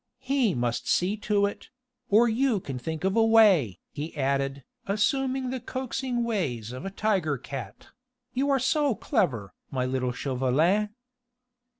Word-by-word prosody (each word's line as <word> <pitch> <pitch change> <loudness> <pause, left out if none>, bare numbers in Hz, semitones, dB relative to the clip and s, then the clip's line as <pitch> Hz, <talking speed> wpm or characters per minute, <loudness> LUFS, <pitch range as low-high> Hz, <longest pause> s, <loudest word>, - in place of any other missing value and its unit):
He 260 - +1
must 120 -1 -1
see 185 +4 +2
to 205 -1 +1
it.... 200 - -5 0.4
Or 225 +4 +5
you 235 -1 +2
can 135 -7 -6
think 160 +6 -5
of 190 0 +1
a 225 - +5
way," 205 - +5
he 155 +2 -6
added, 135 0 0 0.2
assuming 260 +5 0
the 260 - -3
coaxing 255 0 -3
ways 140 - -2
of 130 +8 -7
a - - -2
tiger 190 -8 0
cat; 125 -5 -8 0.4
"you 275 +3 0
are 275 - +4
so 285 0 +1
clever, 155 - -1 0.2
my 130 -2 -1
little 130 -1 -1
Chauvelin." 140 +11 +1
195 Hz, 145 wpm, -27 LUFS, -, 0.4 s, Or